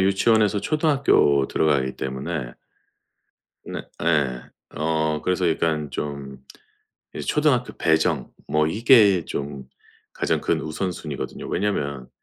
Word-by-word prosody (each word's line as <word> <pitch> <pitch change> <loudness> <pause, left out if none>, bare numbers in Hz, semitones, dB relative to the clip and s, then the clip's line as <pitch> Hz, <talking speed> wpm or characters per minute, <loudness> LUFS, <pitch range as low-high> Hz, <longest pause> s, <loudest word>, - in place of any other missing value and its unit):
유치원에서 100 +2 +3
초등학교 140 - +3
들어가기 70 -4 +1
때문에 65 -1 -4 1.1
네 - - -5 0.2
예. 70 -7 +1 0.3
어 80 0 0
그래서 90 -1 +1
약간 80 -3 0
좀 70 -2 -6 0.7
이 - - -5
초등학교 145 -5 +1
배정 80 -4 +1 0.2
뭐 75 0 +2
이게 105 -2 +5
좀 70 -2 -5 0.5
가장 - - 0
큰 - - 0
우선순위거든요. 80 -2 -5
왜냐하면 70 -10 -2
80 Hz, 245 characters per minute, -23 LUFS, 70-100 Hz, 1.1 s, 이게